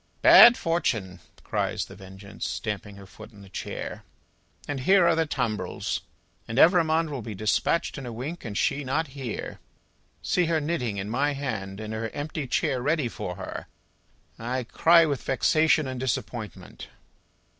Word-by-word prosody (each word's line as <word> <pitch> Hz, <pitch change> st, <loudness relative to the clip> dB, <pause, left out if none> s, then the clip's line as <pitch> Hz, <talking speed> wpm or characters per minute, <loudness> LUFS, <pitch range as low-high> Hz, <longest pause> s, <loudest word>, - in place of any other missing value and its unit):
"Bad 240 Hz, 0 st, +10 dB
Fortune!" 110 Hz, -, -1 dB, 0.2 s
cries -, -, -2 dB
The -, -, -13 dB
Vengeance, 95 Hz, +1 st, -8 dB
stamping 105 Hz, -1 st, -4 dB
her 100 Hz, 0 st, -12 dB
foot 110 Hz, +3 st, -13 dB
in 100 Hz, -2 st, -15 dB
the 95 Hz, -, -14 dB
chair, -, -, -6 dB, 0.6 s
"and 145 Hz, -2 st, -3 dB
here 185 Hz, +7 st, +4 dB
are 170 Hz, -1 st, +4 dB
the 160 Hz, -1 st, +1 dB
tumbrils! 110 Hz, -10 st, -2 dB, 0.5 s
And 115 Hz, -, -5 dB
Evrémonde 165 Hz, -1 st, +4 dB
will 135 Hz, -4 st, -4 dB
be 110 Hz, -1 st, -7 dB
despatched 110 Hz, -, 0 dB
in 130 Hz, -, -7 dB
a -, -, -5 dB
wink, 135 Hz, +10 st, -6 dB
and 105 Hz, -3 st, -5 dB
she 140 Hz, +4 st, 0 dB
not 145 Hz, +4 st, -1 dB
here! 130 Hz, -5 st, -6 dB, 0.6 s
See 180 Hz, -, +1 dB
her 165 Hz, -1 st, +1 dB
knitting 135 Hz, -9 st, -2 dB
in 95 Hz, +1 st, -4 dB
my 145 Hz, +4 st, +1 dB
hand, 110 Hz, -8 st, -4 dB
and 110 Hz, 0 st, -6 dB
her 110 Hz, +1 st, -3 dB
empty 145 Hz, -1 st, -4 dB
chair 125 Hz, +1 st, 0 dB
ready 150 Hz, 0 st, +1 dB
for -, -, -6 dB
her. -, -, -7 dB, 0.7 s
I 125 Hz, +3 st, -2 dB
cry 165 Hz, +7 st, +5 dB
with 140 Hz, -4 st, -2 dB
vexation 155 Hz, +3 st, +2 dB
and 130 Hz, -1 st, -5 dB
disappointment!" 120 Hz, -5 st, -5 dB
130 Hz, 160 wpm, -26 LUFS, 110-155 Hz, 0.7 s, Bad